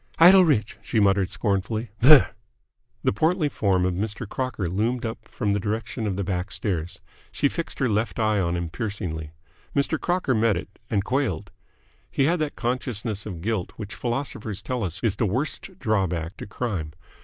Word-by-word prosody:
"Idle 185 +3 +9
rich!" 115 -10 +1
she 110 - 0
muttered 100 -2 +3
scornfully. 100 +3 -1
"Brrh!" 140 +3 +9 0.8
The - - +2
portly 160 - +2
form 95 -7 +1
of 90 - +1
Mr. 105 +4 -3
Crocker 125 -5 -2
loomed 115 +7 0
up 110 - -5
from 105 - -1
the 100 - +1
direction 110 +2 -2
of 100 - -1
the 100 - -1
back 90 +1 -2
stairs. 90 -5 -3 0.3
She 145 - +2
fixed 165 +4 -4
her 130 - +2
left 110 +1 0
eye 110 -2 +2
on 85 -2 0
him 85 -2 -3
piercingly. 90 -8 -4 0.5
Mr. 140 +2 +1
Crocker 175 -7 +1
met 110 -4 +3
it, - - -8
and 100 -2 +1
quailed. 125 - -1 0.6
He 135 - +1
had 165 +5 +2
that 155 -2 -2
consciousness 115 -4 -2
of 90 -6 -6
guilt 105 -1 -2
which 105 -2 -7
philosophers 115 -5 -3
tell 125 -5 -1
is 90 0 -4 0.2
the 110 - +2
worst 130 - -1
drawback 95 - 0
to - - -7
crime. 100 -9 -3
110 Hz, 175 wpm, -25 LUFS, 95-125 Hz, 0.8 s, Idle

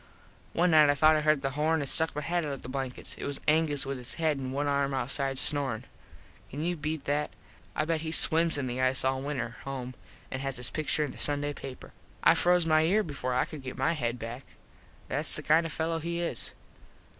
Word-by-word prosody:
One 175 +1 +3
night 155 -2 +7
I 145 - +4
thought 155 +2 +5
I 155 - +2
heard 155 -2 +2
the 135 - 0
horn 155 +3 +1
and 140 - -2
stuck 160 +3 +1
my 150 - -3
head 175 +2 0
out 145 -2 -3
of 135 - -8
the - - -7
blankets. 130 -1 -3
It - - -6
was 140 -1 -1
Angus 155 -2 +2
with 135 -1 -4
his 120 -1 -6
head 155 -3 0
and 130 -1 -4
one 140 +2 -1
arm 140 -1 +1
outside 135 0 0
snorin. 135 -6 0 0.6
Can 145 +3 -5
you 175 +1 0
beat 155 -1 -4
that. 145 +1 0 0.5
I 155 - +1
bet 160 -1 0
he 160 0 -3
swims 165 0 +2
in 140 - -2
the 125 0 -2
ice 130 0 +4
all 130 0 +1
winter 125 -5 -4
home 130 -2 -5 0.4
and 130 - -3
has 135 -1 -1
his 125 - -1
pictur 155 0 0
in 140 - -6
the - - -11
Sunday 145 0 +2
paper. 135 -2 -9 0.3
I - - +7
froze 180 -1 +3
my 155 -1 +4
ear 195 +7 +3
before 130 -6 -3
I - - +2
could 155 -3 -9
get 130 -1 -7
my 135 +5 +2
head 120 -6 -2
back. 120 +3 -7 0.6
Thats - - -1
the - - -2
kind 165 +2 +4
of - - -8
a - - -7
fello 165 0 -1
he 170 +1 -3
is. 170 -9 0
145 Hz, 235 wpm, -29 LUFS, 135-160 Hz, 0.6 s, night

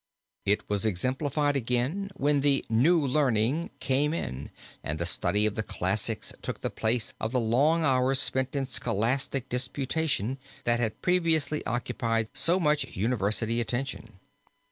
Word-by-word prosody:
It 105 +1 +1
was 105 0 -1
exemplified 135 - 0
again 130 - 0
when 145 0 +2
the 140 -1 +2
"New 150 +8 +4
Learning" 135 +2 +1
came 145 +4 +1
in 65 - -4 0.3
and 75 - -2
the 85 - -1
study 95 +4 +1
of 110 - +1
the 110 - -2
classics - - -2
took - - -5
the - - -2
place 110 +1 0
of 110 - -2
the 125 - +1
long 140 +8 +2
hours 130 0 +3
spent 130 0 +1
in 135 -1 0
scholastic 125 +2 -1
disputation, 130 0 -1 0.2
that 120 0 +2
had 115 -3 -2
previously 165 -4 +2
occupied 115 -2 -1
so 175 +3 +3
much 150 - 0
university 115 +2 0
attention. 120 -2 -4
130 Hz, 145 wpm, -28 LUFS, 110-145 Hz, 0.3 s, New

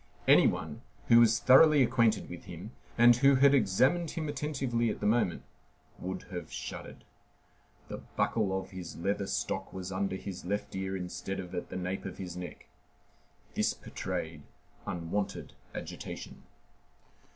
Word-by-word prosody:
Any - - +7
one - - -3 0.3
who 115 - +8
was 115 -1 +5
thoroughly 145 +2 +7
acquainted 115 -3 +2
with 90 -1 -9
him, 90 +5 -8 0.3
and 120 0 +7
who 140 +2 +5
had 140 +1 +6
examined 135 - +3
him 155 -2 -4
attentively 135 -5 -1
at - - -3
the - - -3
moment, 105 -4 +1 0.6
would 95 +1 -5
have 90 -3 -6
shuddered. - - -7 0.8
The - - -6
buckle 95 -4 0
of 95 - -10
his 90 -3 -7
leather 100 +2 -1
stock - - -2
was 95 0 -6
under 95 0 -1
his 95 -1 -7
left 100 +2 -3
ear 95 0 -2
instead 90 +1 -5
of 90 -2 -7
at 90 - -4
the - - -5
nape 95 +2 -3
of 95 - -6
his 90 -2 -6
neck. 90 -3 -8 0.9
This - - +1
betrayed 80 -2 -5 0.5
unwonted 90 +4 -3 0.2
agitation. - - -7
100 Hz, 150 wpm, -31 LUFS, 90-120 Hz, 0.9 s, who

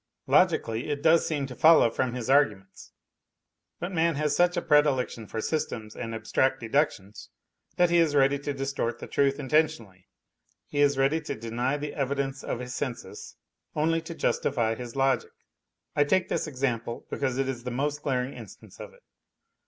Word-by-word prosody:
Logically 115 +5 +2
it 145 -1 -3
does 165 0 +4
seem 145 -3 -1
to 130 - -8
follow 155 -6 +6
from 125 +1 -1
his 120 -2 -4
arguments. 105 -9 +1 0.9
But 175 +2 -4
man 165 -2 +1
has 150 0 0
such 175 +2 +3
a - - +1
predilection 145 -7 +2
for 110 - -4
systems 110 -7 -3
and 115 -2 -5
abstract 130 +4 0
deductions 115 -5 -2 0.5
that 175 -1 +3
he 175 - +4
is 160 -3 +2
ready 140 0 +3
to 145 +1 -3
distort 135 -3 -2
the - - -8
truth 140 -1 +1
inten 150 +4 +3
'tioiially, 95 -10 -13 0.6
he 145 - -4
is 140 -1 +3
ready 140 +4 +2
to 150 - -5
deny 120 +5 -2
the 145 0 -5
evidence 135 0 -2
of - - -3
his 125 0 -6
senses 130 -4 -6 0.4
only 165 +2 +1
to 165 +1 -8
justify 115 -8 0
his 120 +1 -8
logic. 135 0 +1 0.6
I 145 - +4
take 185 +5 +1
this - - -1
example 125 -4 -3
because 130 -2 -1
it 135 0 0
is 125 -3 -4
the 125 - -4
most 145 +4 -2
glaring 130 -2 -1
instance - - -13
of 485 - -10
it. - - -25
135 Hz, 175 wpm, -27 LUFS, 120-150 Hz, 0.9 s, follow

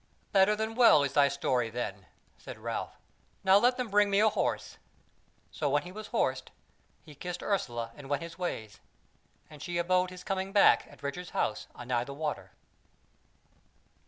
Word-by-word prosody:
"Better 195 +1 +5
than 220 +1 -3
well 230 - +6
is 140 - -2
thy 145 -1 +5
story 130 -4 0
then," 105 -5 -5 0.3
said - - -9
Ralph. - - -5 0.5
"Now 190 +1 +6
let 245 +3 +3
them 250 -3 -3
bring 205 0 +4
me 200 0 +3
a 220 +1 +5
horse." 215 - -2 0.7
So 145 - -1
when 145 +2 +1
he 180 - -9
was 215 +2 -8
horsed, - - -1 0.5
he 155 - -13
kissed 175 +4 -6
Ursula 120 - -2
and 140 -2 -11
went 145 +2 -1
his 165 0 -8
ways. 140 - -5 0.7
And 150 -2 -13
she 175 +3 -3
abode 180 +1 +2
his 185 0 -10
coming 195 -1 -3
back 200 0 +5
at - - -17
Richard's 175 +5 -5
house 105 - -1
anigh 120 -1 -1
the 140 - -8
water. 150 0 -4
175 Hz, 170 wpm, -30 LUFS, 140-195 Hz, 0.7 s, well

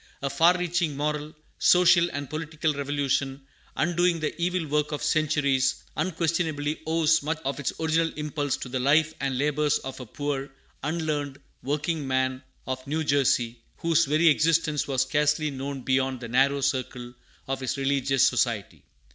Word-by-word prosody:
A 140 - -1
far 175 +2 +4
reaching 170 -4 -1
moral, 150 +1 -2 0.2
social, 175 -1 +5
and 145 -2 -5
political 155 +1 -2
revolution, 140 -1 -1 0.4
undoing 175 +1 +1
the 155 0 -2
evil 180 -1 0
work 150 0 0
of 150 0 -3
centuries, 145 -3 +1
unquestionably 160 -4 -1
owes 160 0 +3
much 155 +2 -2
of 140 +2 -2
its 140 - -1
original 160 0 +1
impulse 150 -2 -2
to - - -7
the 130 +1 -3
life 150 +4 +3
and 135 -2 -1
labors 150 +1 +1
of 135 0 -8
a 125 - -8
poor, 145 +2 -3 0.3
unlearned 150 -2 -2 0.2
workingman 135 -3 -1 0.2
of 130 0 -5
New 155 +3 -1
Jersey, 125 -5 +1 0.2
whose 165 0 +2
very 155 +4 +3
existence 155 -1 +2
was 135 -2 +1
scarcely 150 +2 +1
known 135 0 -5
beyond 130 0 0
the 120 - -7
narrow 135 +4 +2
circle 125 -2 -2 0.3
of 135 0 -2
his 130 0 -3
religious 135 -1 +2
society. 110 - -1
145 Hz, 150 wpm, -26 LUFS, 135-160 Hz, 0.4 s, social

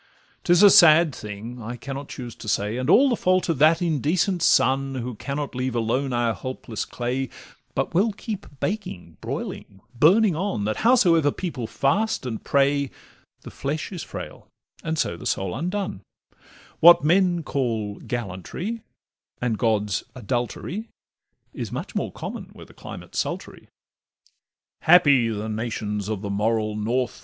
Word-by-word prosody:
'Tis 175 +2 +5
a 205 - +9
sad 165 -2 +7
thing, 110 +3 -8
I 115 +2 -5
cannot 135 +3 -7
choose 120 -3 -7
but 110 - -7
say, 105 +3 0
And 130 +3 -2
all 270 +10 +7
the 250 - +2
fault 185 -3 +1
of 160 -6 0
that 160 +3 +5
indecent 170 - +1
sun, 135 -1 +3
Who 125 0 -4
cannot 140 +6 -4
leave 130 -1 -2
alone 125 +4 0
our 120 -1 +1
helpless 120 0 -5
clay, 125 +2 -3 0.5
But - - -1
will 200 +6 +3
keep 210 0 -6
baking, 90 - -4
broiling, 95 - -6
burning 185 - +4
on, 155 - -2
That 110 0 -1
howsoever 175 - +4
people 145 -11 -4
fast 195 - 0
and 115 -3 -4
pray, 140 0 +2 0.5
The - - -10
flesh 155 +6 -4
is 180 -4 -5
frail, - - -8 0.4
and 160 -1 -2
so 85 - 0
the - - -6
soul 95 -2 -1
undone: 180 - -3 0.8
What 170 -2 +8
men 175 +1 +3
call 115 -8 -2
gallantry, 120 - -5 0.6
and 120 -2 0
gods 105 -3 0
adultery, 125 - -3 0.6
Is - - -5
much - - -5
more - - -2
common - - -6
where - - -12
the - - -18
climate - - -10
's - - -1
sultry. - - -5 1.1
Happy 145 -8 +5
the 110 0 -3
nations 105 -2 -3
of 105 -2 -3
the 100 - -3
moral 110 +1 0
North! 120 +4 -1
130 Hz, 150 wpm, -24 LUFS, 110-170 Hz, 1.1 s, a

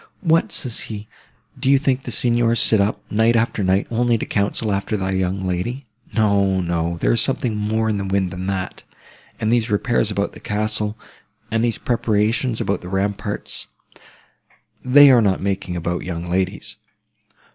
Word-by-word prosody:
'What!' 165 -3 +2
says 125 -4 -1
he, 105 -1 -6 0.5
'do 130 - 0
you 140 - +6
think 135 -1 0
the - - -4
Signors 120 0 +1
sit 110 -3 +4
up, 100 +2 -1
night 110 +2 +3
after 115 -2 +1
night, 95 +1 +2
only 120 0 +2
to - - -4
counsel 105 +2 -1
about 100 0 -1
thy 95 -3 -1
young 95 0 -1
lady! 100 +10 -3 0.3
No, 100 -3 +2
no, 85 -1 -1
there - - +3
is 115 - +2
something 125 -4 0
more 110 +1 0
in 105 -2 0
the 100 - -3
wind 95 -2 0
than 90 +2 -5
that. 95 -1 -3 0.6
And 110 +2 +1
these 115 -2 +1
repairs 110 +1 +1
about 100 -1 -2
the - - -11
castle, 105 0 -2 0.5
and 115 +1 +1
these 120 -2 +1
preparations 115 +1 0
about 100 - -1
the 90 - -8
ramparts—they 105 +6 0
are 125 -2 +6
not 100 -3 +2
making 95 -2 -2
about 85 +1 -2
young 85 -1 -5
ladies. 95 +2 -2
105 Hz, 170 wpm, -21 LUFS, 95-115 Hz, 0.6 s, you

